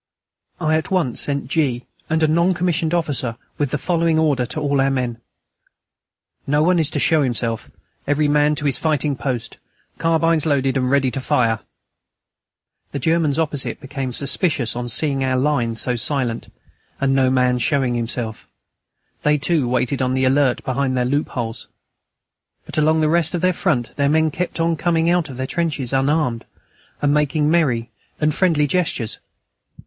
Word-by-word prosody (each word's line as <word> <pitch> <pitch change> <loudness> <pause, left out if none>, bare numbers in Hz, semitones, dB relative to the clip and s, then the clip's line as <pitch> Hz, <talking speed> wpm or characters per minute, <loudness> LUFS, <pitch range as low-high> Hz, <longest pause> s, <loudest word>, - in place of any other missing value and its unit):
I 155 -2 +2
at 160 - -4
once 175 -10 0
sent 140 -3 -2
G. 135 -5 0 0.2
and 160 0 +1
a - - +5
non 170 +4 +2
commissioned 170 -2 0
officer 145 -9 -1 0.2
with 145 -2 +1
the 150 - -1
following 165 +1 +1
order 145 -6 +1
to 155 - -4
all 140 -2 +1
our 135 - +2
men: 125 -4 -2 1.3
"No 145 +2 +2
one 175 +1 +3
is 155 -2 +2
to - - -2
show 160 -2 +3
himself.... 115 -4 -1 0.4
Every 145 +1 +2
man 150 +1 +3
to 150 - -4
his 140 - +2
fighting 150 -2 0
post!... 125 -2 -4 0.4
Carbines 165 -1 +2
loaded 135 -3 +1
and 125 -1 +1
ready 135 -1 +2
to 135 - -4
fire!" 115 -4 +1 1.3
The - - -3
Germans 160 0 +1
opposite 155 -4 -1
became 135 -2 -5
suspicious 140 -1 0
on 120 0 -4
seeing 135 +2 0
our 130 -1 +1
line 130 -4 0
so 125 +2 0
silent, 120 0 -2 0.5
and 135 -1 +1
no 135 -1 +3
man 125 -1 +2
showing 130 0 +1
himself; 115 -1 -3 0.7
they, 150 0 +3
too, 150 -2 0
waited 125 +2 0
on 130 0 +1
the 130 0 +1
alert 135 -1 +2
behind 130 0 -1
their 125 - +1
loopholes. 125 -4 -2 1.0
But - - -2
along 155 +1 +3
the 155 - +3
rest 170 +1 +2
of 170 - -2
their 185 0 +3
front 145 - -1
their 140 -1 +2
men 160 +1 +2
kept 175 +2 -3
on 165 0 +1
coming 165 +1 +1
out 175 -3 +1
from 135 - -9
their 130 +1 -3
trenches 145 -5 -2
unarmed, 135 -3 0 0.6
and 145 0 +3
making 150 0 +1
merry 125 -9 +1 0.3
and 155 0 +2
friendly 160 -4 +2
gestures. 140 -8 -1
145 Hz, 170 wpm, -20 LUFS, 125-160 Hz, 1.3 s, a